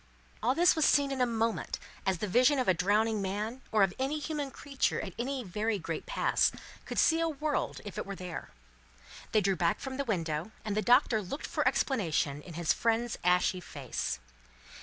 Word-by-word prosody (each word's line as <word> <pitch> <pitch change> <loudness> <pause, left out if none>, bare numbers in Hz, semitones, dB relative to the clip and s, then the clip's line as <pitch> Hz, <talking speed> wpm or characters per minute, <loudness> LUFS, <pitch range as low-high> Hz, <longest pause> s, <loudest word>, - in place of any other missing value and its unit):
All 250 +4 +2
this 350 +2 +5
was 315 - +2
seen 280 -1 +4
in 265 -1 -1
a 250 - +4
moment, 225 -1 -1 0.3
as 190 -2 +2
the 210 - -3
vision 250 +8 +4
of 255 - 0
a 185 - +6
drowning 210 +4 +2
man, 210 +6 -3
or 215 -2 +4
of 190 -1 +2
any 270 +3 0
human 300 -2 -3
creature 275 0 -1
at 190 - -5
any 260 +1 -2
very 210 +3 -1
great 165 -3 -5
pass, - - +2 0.3
could - - -6
see 325 0 +4
a 330 0 +1
world 300 0 -2
if 205 - -6
it - - -3
were 200 - -4
there. 180 -2 -6 0.8
They 215 - +4
drew 195 0 +2
back 170 -1 +1
from 265 -1 -5
the 280 - 0
window, 170 - -2
and 210 -2 -1
the 215 - +2
Doctor 235 0 +4
looked 205 +10 -5
for - - 0
explanation 160 - +1
in 170 0 -10
his 170 -1 +2
friend's 230 0 0
ashy 180 +1 +3
face. 140 -7 -4
220 Hz, 200 wpm, -31 LUFS, 185-265 Hz, 0.8 s, a